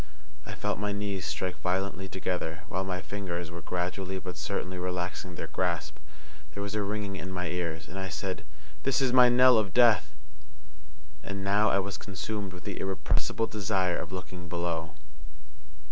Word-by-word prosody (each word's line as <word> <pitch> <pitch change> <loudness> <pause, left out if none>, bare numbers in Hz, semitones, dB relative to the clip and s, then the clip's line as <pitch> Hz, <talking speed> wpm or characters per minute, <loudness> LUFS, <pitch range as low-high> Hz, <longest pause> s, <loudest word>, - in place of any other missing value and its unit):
I - - -5
felt - - -1
my 105 0 0
knees 100 -4 -2
strike 85 +5 -2
violently 95 +1 0
together, 90 -1 -2
while 95 - 0
my 90 -1 -2
fingers 90 -4 -3
were 85 0 -6
gradually 90 +2 -2
but 90 -1 -5
certainly 90 0 -2
relaxing 90 0 -2
their - - -3
grasp. 85 -4 -1 0.6
There 100 - -2
was 100 0 -3
a 105 - +1
ringing 100 -1 -2
in 95 +1 -5
my 90 -2 -2
ears, 85 -2 -2
and 95 - -6
I 95 0 -3
said, 95 +1 -3 0.4
"This 135 -1 +2
is 130 -2 +3
my 125 -1 +9
knell 125 -1 +8
of 100 -4 -2
death!" 105 -11 +6 1.1
And 100 0 -4
now 100 +2 +4
I 100 - +4
was 100 -1 -1
consumed 100 0 -4
with 90 0 -10
the - - -4
irrepressible 95 +3 +1
desire 95 -4 +1
of - - -5
looking 90 -1 -6
below. 85 -2 -2
95 Hz, 170 wpm, -30 LUFS, 90-100 Hz, 1.1 s, my